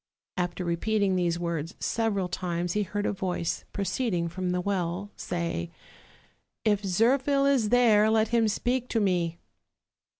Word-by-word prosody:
'' -, -, -67 dB
After 180 Hz, 0 st, -2 dB
repeating 195 Hz, +3 st, +1 dB
these 175 Hz, -2 st, +1 dB
words 170 Hz, 0 st, -3 dB
several 210 Hz, -5 st, 0 dB
times 175 Hz, -1 st, -2 dB
he 210 Hz, -, +1 dB
heard 205 Hz, +1 st, -2 dB
a -, -, 0 dB
voice, 180 Hz, -3 st, -2 dB
proceeding 195 Hz, -4 st, -1 dB
from 180 Hz, +1 st, -3 dB
the 180 Hz, 0 st, 0 dB
well, 185 Hz, +1 st, -2 dB
say: 170 Hz, -, -3 dB, 1.0 s
"If 210 Hz, -2 st, +3 dB
Zirphil 260 Hz, +8 st, +2 dB
is 265 Hz, -6 st, +3 dB
there, 220 Hz, -3 st, +5 dB
let 220 Hz, 0 st, +3 dB
him 230 Hz, -2 st, +3 dB
speak 245 Hz, +4 st, -1 dB
to 230 Hz, -, +1 dB
me." 175 Hz, -5 st, 0 dB
195 Hz, 145 wpm, -27 LUFS, 175-220 Hz, 1.0 s, there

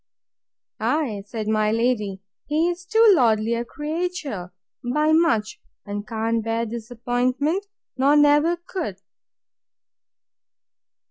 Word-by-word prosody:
Ay, 270 Hz, -10 st, 0 dB
said 215 Hz, 0 st, -5 dB
my 215 Hz, -1 st, +2 dB
lady, 215 Hz, -4 st, 0 dB, 0.2 s
he 315 Hz, +4 st, +2 dB
is 355 Hz, 0 st, -9 dB
too 445 Hz, +1 st, +6 dB
lordly 225 Hz, -5 st, +2 dB
a 235 Hz, 0 st, -1 dB
creature, 295 Hz, -, -4 dB, 0.3 s
by 300 Hz, +6 st, +1 dB
much; 230 Hz, -10 st, +2 dB, 0.2 s
and 205 Hz, 0 st, -5 dB
can't 225 Hz, 0 st, -1 dB
bear 225 Hz, +1 st, -1 dB
disappointment, 245 Hz, -, -2 dB, 0.3 s
nor 275 Hz, +2 st, +4 dB
ever 295 Hz, +4 st, +3 dB
could. 345 Hz, -, -5 dB
245 Hz, 105 wpm, -23 LUFS, 220-315 Hz, 0.3 s, too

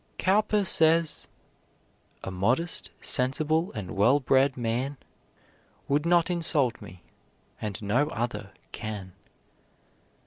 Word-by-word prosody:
Cowper 205 Hz, +1 st, +2 dB
says: 165 Hz, -2 st, +3 dB, 1.0 s
A 95 Hz, -, -5 dB
modest, 120 Hz, -, 0 dB
sensible, 155 Hz, +6 st, 0 dB
and 105 Hz, -4 st, -6 dB
well 120 Hz, +9 st, +4 dB
bred 135 Hz, 0 st, +2 dB
man 125 Hz, +4 st, -2 dB, 0.9 s
Would 145 Hz, +3 st, +1 dB
not 175 Hz, 0 st, +3 dB
insult 155 Hz, -8 st, +2 dB
me, 85 Hz, 0 st, -12 dB, 0.6 s
and 105 Hz, -3 st, -4 dB
no 120 Hz, +9 st, +1 dB
other 110 Hz, -6 st, -4 dB, 0.2 s
can. 105 Hz, -5 st, -6 dB
130 Hz, 100 wpm, -27 LUFS, 110-160 Hz, 1.0 s, well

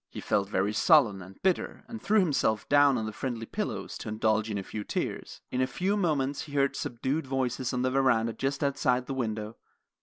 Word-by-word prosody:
He -, -, -8 dB
felt 100 Hz, -1 st, 0 dB
very 100 Hz, +1 st, 0 dB
sullen 110 Hz, -, +4 dB
and 95 Hz, +2 st, -13 dB
bitter, 185 Hz, -2 st, 0 dB
and 225 Hz, -2 st, -8 dB
threw 215 Hz, +1 st, +3 dB
himself 135 Hz, -, +1 dB
down 145 Hz, -2 st, +5 dB
on 110 Hz, -, -2 dB
the 110 Hz, -, -5 dB
friendly 120 Hz, -1 st, -4 dB
pillows -, -, -4 dB
to -, -, -6 dB
indulge 110 Hz, 0 st, +1 dB
in 105 Hz, -, -2 dB
a 100 Hz, -, -3 dB
few 105 Hz, +2 st, -6 dB
tears. -, -, -4 dB
In 125 Hz, -, 0 dB
a 130 Hz, -, +2 dB
few 185 Hz, +10 st, -1 dB
moments 145 Hz, -8 st, 0 dB
he 145 Hz, -, -12 dB
heard 140 Hz, -1 st, +2 dB
subdued 130 Hz, +5 st, -2 dB
voices 130 Hz, -1 st, -1 dB
on 125 Hz, 0 st, -1 dB
the 130 Hz, -, +1 dB
veranda 120 Hz, -4 st, +2 dB
just 135 Hz, +6 st, -2 dB
outside 135 Hz, -3 st, +1 dB
the 135 Hz, -, -4 dB
window. 110 Hz, -3 st, -3 dB
130 Hz, 210 wpm, -28 LUFS, 110-140 Hz, -, down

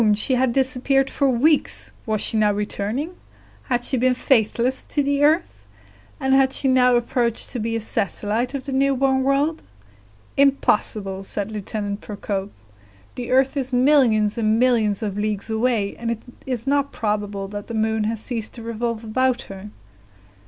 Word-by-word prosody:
She 215 Hz, +5 st, +2 dB
had 255 Hz, 0 st, +2 dB
disappeared 265 Hz, +1 st, +1 dB
for 280 Hz, -2 st, +1 dB
weeks; 285 Hz, +5 st, +2 dB, 0.2 s
was 215 Hz, -1 st, 0 dB
she -, -, +2 dB
now 215 Hz, -1 st, +3 dB
returning? 210 Hz, -, -3 dB, 0.5 s
Had 245 Hz, -2 st, -1 dB
she 260 Hz, -, +3 dB
been 255 Hz, +1 st, +2 dB
faithless 245 Hz, 0 st, +1 dB
to 290 Hz, -, 0 dB
the 285 Hz, +1 st, +1 dB
earth? 315 Hz, +4 st, +1 dB, 0.5 s
and 265 Hz, -1 st, +1 dB
had 270 Hz, 0 st, +4 dB
she 275 Hz, -, +3 dB
now 250 Hz, -1 st, +4 dB
approached 235 Hz, -1 st, 0 dB
to 250 Hz, -, -4 dB
be 230 Hz, +1 st, -2 dB
a -, -, 0 dB
satellite 220 Hz, +4 st, -1 dB
of 270 Hz, -, -5 dB
the 280 Hz, -, -5 dB
new 275 Hz, +1 st, +2 dB
born 265 Hz, 0 st, +2 dB
world? 280 Hz, +4 st, +1 dB, 0.8 s
"Impossible!" 210 Hz, -8 st, +1 dB
said 200 Hz, +2 st, -3 dB
Lieutenant 205 Hz, -1 st, -4 dB
Procope; 200 Hz, -1 st, -4 dB, 0.6 s
"the 245 Hz, -1 st, -6 dB
earth 265 Hz, +2 st, +2 dB
is 265 Hz, -2 st, -2 dB
millions 245 Hz, -5 st, +3 dB
and 215 Hz, 0 st, +2 dB
millions 225 Hz, -5 st, +2 dB
of 205 Hz, -1 st, -3 dB
leagues 210 Hz, +1 st, -2 dB
away, 220 Hz, -3 st, 0 dB
and 230 Hz, 0 st, -4 dB
it 230 Hz, -1 st, -3 dB, 0.2 s
is 250 Hz, -3 st, -3 dB
not 280 Hz, 0 st, +1 dB
probable 205 Hz, -2 st, -3 dB
that 205 Hz, 0 st, -7 dB
the 230 Hz, -, -5 dB
moon 220 Hz, 0 st, 0 dB
has 225 Hz, 0 st, -2 dB
ceased 225 Hz, -3 st, -4 dB
to 235 Hz, -, -9 dB
revolve 230 Hz, 0 st, -3 dB
about 255 Hz, +3 st, 0 dB
her." 195 Hz, +1 st, -10 dB
235 Hz, 165 wpm, -22 LUFS, 215-265 Hz, 0.8 s, had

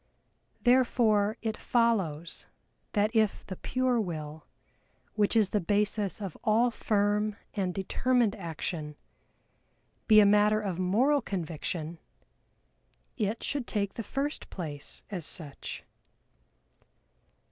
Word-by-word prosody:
Therefore 235 Hz, -4 st, +3 dB
it 220 Hz, -1 st, -1 dB
follows 195 Hz, -12 st, 0 dB, 0.5 s
that 215 Hz, +2 st, +1 dB
if 215 Hz, -2 st, +2 dB
the 185 Hz, -, -6 dB
pure 255 Hz, +3 st, 0 dB
will, 155 Hz, -5 st, -6 dB, 0.7 s
which 210 Hz, +1 st, +1 dB
is 215 Hz, -4 st, +4 dB
the 210 Hz, -, +1 dB
basis 205 Hz, +2 st, 0 dB
of 195 Hz, -6 st, -5 dB
all 230 Hz, +3 st, +3 dB
firm 210 Hz, -1 st, +1 dB, 0.2 s
and 190 Hz, -3 st, -1 dB
determined 225 Hz, +4 st, +1 dB
action, 160 Hz, -4 st, -5 dB, 1.1 s
be 215 Hz, -1 st, +8 dB
a 210 Hz, -, +7 dB
matter 210 Hz, +1 st, +4 dB
of 190 Hz, -4 st, -3 dB
moral 245 Hz, +11 st, +3 dB
conviction, 165 Hz, -4 st, -4 dB, 1.2 s
it 220 Hz, -1 st, -2 dB
should 280 Hz, -4 st, -2 dB
take 200 Hz, -2 st, -1 dB
the -, -, -4 dB
first 275 Hz, +6 st, -3 dB
place 150 Hz, -6 st, -5 dB
as 180 Hz, -4 st, -4 dB
such. 145 Hz, -2 st, -4 dB
205 Hz, 110 wpm, -29 LUFS, 180-225 Hz, 1.2 s, be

